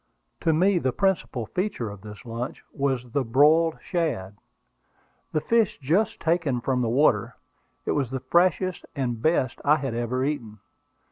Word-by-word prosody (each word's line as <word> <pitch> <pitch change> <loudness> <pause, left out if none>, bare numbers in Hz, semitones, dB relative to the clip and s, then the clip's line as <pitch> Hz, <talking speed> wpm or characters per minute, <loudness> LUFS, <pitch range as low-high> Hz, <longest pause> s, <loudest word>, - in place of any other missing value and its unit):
To 165 - +2
me 180 +4 +3
the 130 -5 0
principal 185 - 0
feature 180 - -3
of 100 -1 -11
this 105 +1 -11
lunch 115 +2 -5
was 130 -3 -1
the 140 +2 +1
broiled 150 +7 +4
shad, 130 - -2 1.0
the 155 - +1
fish 230 +1 +2
just 165 +10 +1
taken 160 -6 +1
from 125 +1 0
the 120 - 0
water. 125 -1 +2 0.5
It - - 0
was 140 -5 0
the 130 +1 -3
freshest 180 +4 +1
and 120 -5 -2
best 130 -4 +1
I 145 +2 +5
had 135 -5 -3
ever 120 +2 -1
eaten. 120 -8 -3
135 Hz, 155 wpm, -25 LUFS, 120-165 Hz, 1.0 s, I